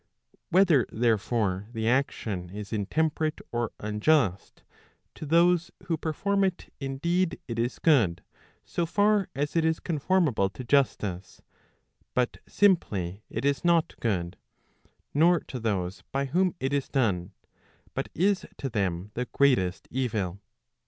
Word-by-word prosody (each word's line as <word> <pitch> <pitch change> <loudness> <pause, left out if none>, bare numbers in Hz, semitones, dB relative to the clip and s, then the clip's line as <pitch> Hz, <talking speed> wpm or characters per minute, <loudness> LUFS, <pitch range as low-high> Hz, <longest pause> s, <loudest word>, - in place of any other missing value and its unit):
Whether 175 - +4
therefore, 110 -3 0
the 110 -1 -2
action 110 -8 0
is 105 +2 -7
intemperate 155 - 0
or 120 -2 -1
unjust, 105 - +1 0.5
to 155 - -8
those 170 +2 +4
who 165 - -1
perform 195 +6 0
it 185 -2 -2
indeed 170 +6 -1
it 115 -2 -4
is 120 +2 -1
good, 120 - +3 0.4
so 170 -1 -2
far 205 +2 +2
as 145 +4 -2
it 165 - +3
is 160 0 +1
conformable 155 - +1
to 110 +6 -8
justice, 105 -9 0 0.7
but 125 -1 0
simply 105 - +1
it 115 +5 -3
is 140 0 +1
not 170 -1 +3
good, 90 -5 -1 0.8
nor 170 +3 +4
to 130 - -7
those 95 -5 -2
by 135 +1 0
whom 180 +7 +1
it 135 -1 -1
is 140 -1 -1
done, 100 -8 0 0.6
but - - -3
is 195 +3 +1
to 135 - -3
them 95 -3 -2
the 125 +2 -2
greatest 120 -10 +1
evil. 105 -8 -2
130 Hz, 130 wpm, -27 LUFS, 105-165 Hz, 0.8 s, Whether